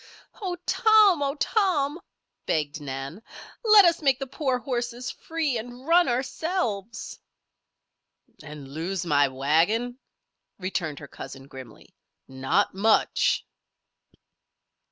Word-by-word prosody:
"Oh, 370 -3 -2
Tom! 430 -7 +5
Oh, 280 0 0
Tom!" 330 - +1 0.5
begged 150 -1 -1
Nan. 135 +6 -6 0.4
"Let 425 -3 +8
us 335 -1 +3
make 270 -3 +3
the 270 - -4
poor 265 -1 -1
horses 245 -1 -4
free, 315 -7 -2
and 245 +3 -10
run 345 +2 +5
ourselves." 240 - -3 1.2
"And 150 -2 -10
lose 170 +6 -4
my 145 -3 +3
wagon?" 165 - +1 0.6
returned 180 -5 -3
her - - -9
cousin, 135 0 -10
grimly. 130 -4 -13 0.3
"Not 130 0 0
much!" 215 +3 +2
240 Hz, 105 wpm, -26 LUFS, -, 1.2 s, Let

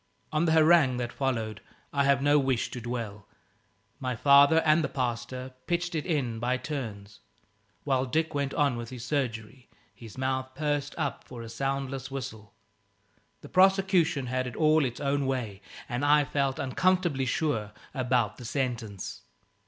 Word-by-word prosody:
On 155 +2 +2
the 160 - +3
harangue 155 -5 +5
that 120 -1 -3
followed 115 -6 -2 0.3
I 140 -1 +2
have 140 0 +3
no 145 +1 +5
wish 130 -4 0
to 125 - -6
dwell. 115 -4 -5 0.7
My 130 -2 -2
father 140 +4 +6
and 155 +1 +4
the - - -1
pastor 125 +1 -3
pitched 175 0 -1
it 155 0 -2
in 130 -9 -1
by 125 +2 0
turns, 110 -9 -6 0.6
while 135 -2 +1
Dick 160 +4 0
went 140 -1 -1
on 140 -5 +2
with 120 -1 -6
his 125 -2 -7
surgery, 125 -2 -3 0.2
his 115 0 -12
mouth 130 0 -2
pursed 145 -1 -1
up 145 -4 -2
for 120 -2 -9
a 115 - -8
soundless 135 +2 -3
whistle. 110 -6 -7 0.9
The - - -11
prosecution 185 -6 +3
had 130 +1 -1
it 120 - -7
all 155 -1 +4
its 120 -2 -4
own 140 -1 0
way, 115 -7 -3 0.3
and 125 +1 -3
I 145 0 +5
felt 135 -1 0
uncomfortably 170 -1 +1
sure 115 -7 -1 0.2
about 125 -5 0
the 125 - -9
sentence. 115 -6 -3
135 Hz, 160 wpm, -28 LUFS, 120-145 Hz, 0.9 s, father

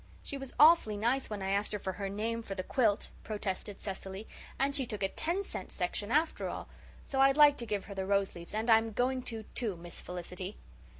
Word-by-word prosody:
"She - - -4
was 270 -1 -6
awfully 300 -9 +7
nice 240 +6 +1
when 205 -2 -4
I 190 - -1
asked 200 +2 0
her - - 0
for 190 -1 -3
her 195 +1 -3
name 225 +3 -2
for 200 -3 -6
the 185 - -3
quilt," 215 -1 +1
protested 205 -1 -4
Cecily, 195 +1 -6 0.3
"and 275 +1 +2
she 270 -3 +1
took 210 -3 -3
a 195 - +2
ten 345 - -1
cent - - -7
section 190 +3 -2
after 305 +6 +1
all. - - -5 0.4
So 270 -1 0
I'd 270 +1 +6
like 295 -1 +8
to 235 - -5
give 205 -2 -2
her 200 - -7
the 190 -1 -3
rose 200 -1 +2
leaves 170 +3 -8
and 220 +2 -1
I'm 225 -1 +5
going 255 +3 +1
to, 225 -3 -5
too, 220 -6 0
Miss 170 0 -9
Felicity." 180 +2 -6
215 Hz, 225 wpm, -32 LUFS, 195-255 Hz, 0.4 s, like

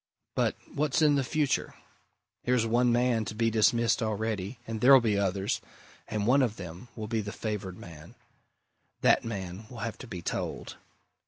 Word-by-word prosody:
But - - +1 0.2
what's 150 +1 +1
in 150 -1 +5
the 140 -1 +2
future? 145 +1 0 0.7
Here's 125 -2 +2
one 120 +2 +3
man 120 -1 +2
to 110 - -5
be 115 +1 +1
dismissed 115 +1 +3
already, 110 0 -2
and 115 -2 -5
there'll 135 +1 +9
be 110 -4 +1
others, 100 0 0 0.5
and 105 -1 -2
one 135 +5 +5
of 120 -5 +1
them 90 +5 -9
will 110 - -5
be 110 0 -1
the 105 0 -5
favoured 100 -5 -4
man. 80 -3 -12 0.9
That - - +4
man 100 -2 -5
will 125 - -10
have 115 - -5
to 130 - -9
be 90 -5 -7
told! - - -4
110 Hz, 170 wpm, -29 LUFS, 100-125 Hz, 0.9 s, there'll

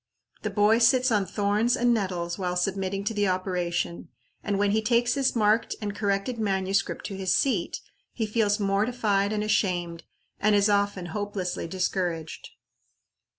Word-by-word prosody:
The 215 - -2
boy 210 +2 +3
sits 250 +1 +4
on 205 -3 +1
thorns 210 +3 +1
and 240 0 +3
nettles 180 -4 -2
while 180 -1 -2
submitting 195 +1 -1
to 205 - -2
the 205 -1 +1
operation, 180 -2 -2 0.3
and 205 -1 -1
when 200 0 +2
he 220 +1 +2
takes 240 +2 +2
his 270 -2 0
marked 215 0 +2
and 205 -2 -4
corrected 205 +4 -1
manuscript 195 -2 -1
to 200 - -5
his 190 -1 +1
seat, 230 -11 0 0.3
he 225 - -2
feels 210 -1 +1
mortified 200 0 +1
and 210 -1 -1
ashamed, 175 -5 0 0.4
and 210 0 +3
is 205 +1 +3
often 200 -2 +1
hopelessly 205 -4 -3
discouraged. 175 -2 -3
200 Hz, 150 wpm, -26 LUFS, 190-215 Hz, 0.4 s, sits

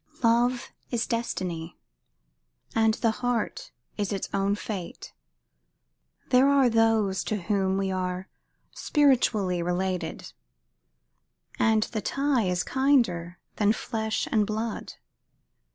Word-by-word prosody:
Love 240 +2 +2 0.2
is 235 -2 0
destiny; 180 -8 -3 1.0
and 220 -1 +3
the 230 -2 +1
heart 245 - -2 0.3
is 205 -1 -1
its 195 -2 -2
own 200 +1 +1
fate. 200 -4 -6 1.2
There 260 +2 +5
are 275 -3 +4
those 220 -4 +2
to 210 -4 -2
whom 195 -1 +1
we 195 -1 -1
are 185 0 -3 0.4
spiritually 225 - +2
related, 180 +1 -2 1.3
and 220 -1 +3
the 220 -1 -4
tie 275 -1 +1
is 180 0 0
kinder 230 -11 +1 0.2
than 210 0 +3
flesh 220 -1 -2
and 210 -2 +2
blood. 220 +1 -3
215 Hz, 105 wpm, -27 LUFS, 190-235 Hz, 1.3 s, There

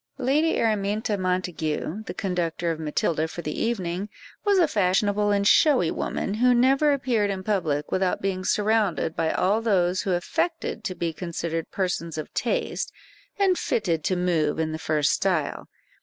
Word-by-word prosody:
Lady 285 +5 +1
Araminta 210 -1 0
Montague, 180 -1 -2
the - - -4
conductor 175 -3 -1
of 160 - -4
Matilda 155 +1 0
for 170 +2 -7
the 150 - -3
evening, 195 -3 -2 0.3
was 405 -2 +3
a 345 -3 +5
fashionable 205 0 +1
and 200 0 +2
showy 255 - +5
woman, 195 - -2
who 245 +3 +3
never 270 +5 +4
appeared 245 -7 +1
in 190 -1 -3
public 165 -8 -1
without 185 -1 +1
being 190 -1 -2
surrounded 210 -5 +1
by 160 -1 0
all 205 +4 +1
those 185 -5 +2
who 190 - -1
affected 225 - -2
to 185 - -3
be 170 -2 -2
considered 165 -1 -4
persons 175 -4 -2
of 155 - -6
taste, - - -1 0.5
and 385 -3 +2
fitted 170 -8 0
to 185 - +1
move 170 -4 +1
in 160 -1 -1
the 155 - -4
first 150 -2 +1
style. 175 -7 -1
185 Hz, 160 wpm, -25 LUFS, 170-220 Hz, 0.5 s, a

